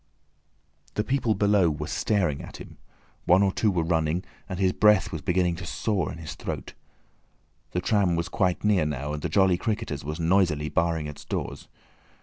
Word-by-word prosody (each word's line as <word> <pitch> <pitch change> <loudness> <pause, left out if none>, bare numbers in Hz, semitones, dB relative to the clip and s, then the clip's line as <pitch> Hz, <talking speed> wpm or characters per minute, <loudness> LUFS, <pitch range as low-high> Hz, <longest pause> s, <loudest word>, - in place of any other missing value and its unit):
The 105 - +1
people 125 -3 +1
below 100 -4 +3
were 75 0 -3
staring 85 -5 0
at - - -9
him, - - -12 0.5
one 90 +3 +5
or 95 - +2
two 105 - +1
were 90 -4 +1
running, 80 +1 0 0.3
and 95 - -4
his 95 -1 +2
breath 105 -3 +4
was 80 - -4
beginning 90 0 +1
to 90 - -7
saw 95 -3 -1
in - - -7
his 80 -4 -7
throat. - - -6 1.0
The 90 - 0
tram 95 -3 +2
was 85 0 -1
quite 90 -3 0
near 100 -7 +3
now, 75 0 -3
and 75 - -4
the - - -2
"Jolly 95 -3 +3
Cricketers" 105 -10 -3
was 75 +3 -5
noisily 85 -3 +2
barring 80 0 0
its 75 -1 -8
doors. - - -5
90 Hz, 180 wpm, -26 LUFS, 80-100 Hz, 1.0 s, one